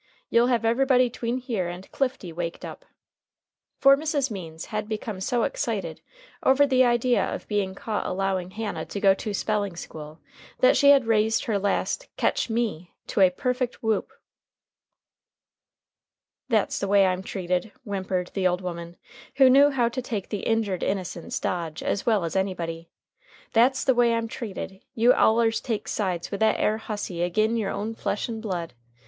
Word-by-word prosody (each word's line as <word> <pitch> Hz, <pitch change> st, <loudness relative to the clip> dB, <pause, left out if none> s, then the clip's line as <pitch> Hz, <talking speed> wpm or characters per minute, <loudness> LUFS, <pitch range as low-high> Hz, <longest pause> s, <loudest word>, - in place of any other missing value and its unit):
You'll 235 Hz, +1 st, +4 dB
have 235 Hz, -3 st, +1 dB
everybody 250 Hz, +1 st, +3 dB
'tween 240 Hz, +1 st, -2 dB
here 235 Hz, -8 st, -2 dB
and 180 Hz, +2 st, -8 dB
Clifty 255 Hz, -10 st, -2 dB
waked 170 Hz, 0 st, -4 dB
up." -, -, -9 dB, 0.9 s
For 275 Hz, 0 st, +7 dB
Mrs. 285 Hz, -3 st, -1 dB
Means 165 Hz, -5 st, -7 dB
had 215 Hz, 0 st, -2 dB
become 215 Hz, -3 st, -4 dB
so 240 Hz, +3 st, 0 dB
excited 205 Hz, -, -3 dB, 0.4 s
over 270 Hz, +2 st, +5 dB
the 260 Hz, -2 st, +4 dB
idea 240 Hz, 0 st, +2 dB
of -, -, -4 dB
being 200 Hz, -3 st, -1 dB
caught 215 Hz, +1 st, -3 dB
allowing 190 Hz, -1 st, -1 dB
Hannah 210 Hz, +2 st, -4 dB
to 200 Hz, -, -5 dB
go 195 Hz, -1 st, +5 dB
to 210 Hz, +2 st, -5 dB
spelling 205 Hz, -2 st, -1 dB
school 155 Hz, -2 st, -9 dB, 0.4 s
that -, -, +5 dB
she 280 Hz, -, +5 dB
had 275 Hz, -3 st, +6 dB
raised 220 Hz, 0 st, +2 dB
her 210 Hz, -3 st, 0 dB
last 205 Hz, -, -1 dB
"Ketch -, -, 0 dB
me!" 220 Hz, -7 st, -2 dB
to -, -, -1 dB
a 185 Hz, -, +7 dB
perfect 250 Hz, +7 st, -2 dB
whoop. 220 Hz, -2 st, 0 dB, 2.4 s
"That's 220 Hz, -4 st, +1 dB
the 200 Hz, -, -2 dB
way 200 Hz, 0 st, +5 dB
I'm 185 Hz, 0 st, 0 dB
treated," 180 Hz, +1 st, -2 dB
whimpered 190 Hz, -3 st, -3 dB
the 190 Hz, -2 st, +2 dB
old 180 Hz, 0 st, 0 dB
woman, 170 Hz, -1 st, -6 dB, 0.4 s
who 265 Hz, -2 st, +6 dB
knew 280 Hz, +2 st, +7 dB
how 255 Hz, -4 st, +1 dB
to 255 Hz, +2 st, -4 dB
take 220 Hz, -6 st, -4 dB
the 205 Hz, -, -3 dB
"injured 220 Hz, -5 st, 0 dB
innocence" 185 Hz, -3 st, -3 dB
dodge 165 Hz, -3 st, -3 dB
as 200 Hz, -, -2 dB
well 215 Hz, -5 st, +3 dB
as 165 Hz, -, -4 dB
anybody. 170 Hz, -4 st, -2 dB, 0.6 s
"That's 255 Hz, +4 st, +4 dB
the 260 Hz, -, +3 dB
way 240 Hz, -1 st, +3 dB
I'm 230 Hz, 0 st, -1 dB
treated. 195 Hz, -4 st, -7 dB
You 240 Hz, +2 st, +5 dB
allers 225 Hz, 0 st, +3 dB
take 225 Hz, -3 st, -3 dB
sides 185 Hz, -5 st, -2 dB
with 200 Hz, -, -3 dB
that 220 Hz, 0 st, +3 dB
air 215 Hz, +1 st, +1 dB
hussy 205 Hz, -6 st, -4 dB
agin 215 Hz, +6 st, +1 dB
your 215 Hz, -4 st, -1 dB
own 215 Hz, +2 st, -3 dB
flesh 210 Hz, -, -2 dB
and 225 Hz, -2 st, -5 dB
blood. 180 Hz, -6 st, -4 dB
215 Hz, 170 wpm, -25 LUFS, 185-240 Hz, 2.4 s, For